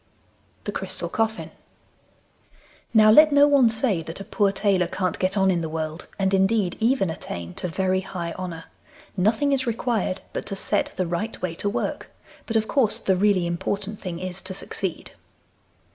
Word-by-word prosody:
THE - - -3
CRYSTAL - - -3
COFFIN 225 0 -2 1.4
Now 215 -1 +6
let 305 +6 +7
no 285 0 +6
one 275 -5 +5
say 220 -5 +4
that 165 +3 -7
a - - -6
poor 200 0 +1
tailor 195 -3 +1
can't 185 -1 -2
get 185 +2 0
on 190 -1 +4
in 175 -2 0
the 160 - -3
world, 155 +1 -5
and, 195 0 0
indeed, 195 -1 +2
even 225 -6 +2
attain 85 - -7
to - - -1
very 185 +2 0
high 175 -3 -5
honour. 175 -3 -6 0.5
Nothing 220 +9 +2
is 265 -2 0
required 225 -5 -1
but - - -4
to 195 - -3
set - - +1
the 185 - -1
right 175 +7 -3
way 180 -2 -1
to 200 +4 -2
work, - - -3 0.4
but 225 - -3
of 220 -1 +2
course 250 -7 +2
the 190 - +1
really 190 -2 +2
important 200 +4 -3
thing 180 -3 -5
is 185 +1 -4
to 190 0 -5
succeed. 190 -2 -3
195 Hz, 175 wpm, -24 LUFS, 180-220 Hz, 1.4 s, let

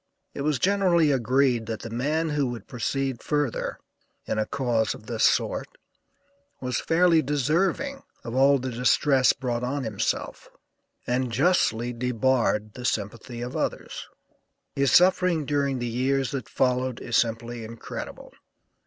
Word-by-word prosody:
It - - -5
was 150 -1 +1
generally 180 -5 +3
agreed 125 -2 +2
that 110 -2 -4
the 115 - -7
man 150 +7 0
who 145 -2 0
would 120 -2 -6
proceed 130 +1 -2
further, 145 -5 -1 0.5
in 110 - -1
a 110 - 0
cause 120 -5 0
of 105 - -14
this 115 -1 -2
sort, - - +2 0.9
was 125 -2 -2
fairly 165 -1 +3
deserving 170 - 0 0.2
of 115 - -6
all 135 +2 +5
the 130 0 -4
distress 130 +2 +3
brought 125 -3 -3
on 140 +2 -2
himself, 110 -4 -3 0.6
and 125 0 -1
justly 125 -4 +2
debarred 120 -3 0
the 125 - -9
sympathy 115 +2 -3
of 125 +1 -5
others. - - -3 0.7
His 140 -1 +2
suffering 180 -3 +4
during 140 -2 0
the 120 - -3
years 130 +3 0
that 135 -5 -5
followed 125 -1 0
is 120 - -3
simply 115 0 0
incredible. 115 +1 -8
130 Hz, 140 wpm, -25 LUFS, 120-145 Hz, 0.9 s, all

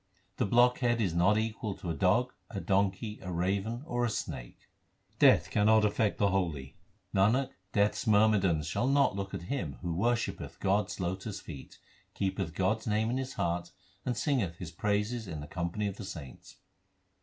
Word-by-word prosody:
The - - +1
blockhead 120 +1 +3
is 95 -7 +1
not 90 +5 +4
equal 110 -2 -2
to 85 - -5
a - - -1
dog, 105 +9 +2 0.2
a 100 - -4
donkey, 100 +2 0
a 90 - -5
raven, 100 +8 -1
or 120 -4 -1
a 120 - +2
snake. - - -5 0.6
Death - - +5
cannot 110 +1 +4
affect 105 0 +1
the 100 - +3
holy: 80 -9 -2 0.4
Nanak, 115 +8 +3 0.2
Death 100 +1 +3
s - - -6
myrmidons 100 -7 +4
shall 85 - 0
not 140 -6 +3
look 100 0 -4
at - - -5
him 90 - -3
who 85 -2 -1
worshippeth 115 +6 -1
God 100 +1 +2
s - - -7
lotus 95 +3 -3
feet, 75 -5 -10 0.4
Keepeth 95 -4 -2
God 95 +4 +2
s 110 - -11
name 110 +2 +1
in 125 - 0
his 130 0 -3
heart, 85 0 -1 0.3
and 125 -2 -2
singeth 115 - 0
His 85 -1 -7
praises 105 +5 -1
in 80 -4 -5
the 75 - -6
company 85 +5 -3
of 100 -1 -3
the - - -7
saints. 80 -9 -9
100 Hz, 180 wpm, -31 LUFS, 90-110 Hz, 0.6 s, Death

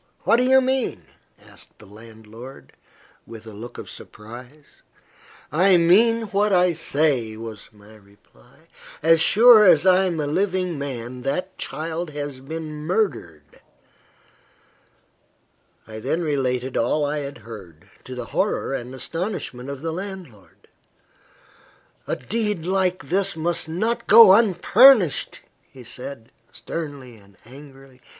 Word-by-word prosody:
What 220 +6 +3
do 250 - +2
you 265 +1 +4
mean?" 260 - -2 0.3
asked - - -12
the - - -16
landlord, 110 - -14 0.5
with 115 -1 -12
a 110 - -11
look 120 +4 -10
of - - -9
surprise. 120 +7 -13 0.7
"I 185 +4 +4
mean 225 +7 +4
what 205 +2 +1
I 180 -1 +3
say," 140 -8 -1
was 110 -2 -9
my 105 0 -18
reply. 100 - -25 0.4
"As 165 0 +4
sure 225 +4 +7
as 180 -4 +5
I 190 0 +4
am 170 -3 -2
a 150 - -1
living 180 0 -1
man, 125 -3 -6
that 180 +8 -3
child 165 +2 -5
has 145 -2 -5
been 155 +2 -7
murdered." 150 - -3 2.3
I 110 0 -9
then 150 +9 -2
related 130 -4 -2
all 145 +6 0
I 150 +1 -2
had 140 -1 -7
heard, 100 -8 -13 0.2
to 130 - -8
the 125 -1 -6
horror 195 -7 -1
and 125 0 -6
astonishment 150 - -5
of 140 +1 -8
the 165 -1 -3
landlord. 180 - -10 1.4
"A - - -1
deed 210 - -3
like 185 -5 -1
this 195 +1 0
must 165 +1 -2
not 225 +8 -2
go 220 -2 +9
unpunished," 210 - +4 0.3
he 130 - -14
said, 125 0 -9 0.2
sternly 140 -7 -8
and 100 -2 -22
angrily. 135 0 -16
150 Hz, 130 wpm, -22 LUFS, 120-185 Hz, 2.3 s, go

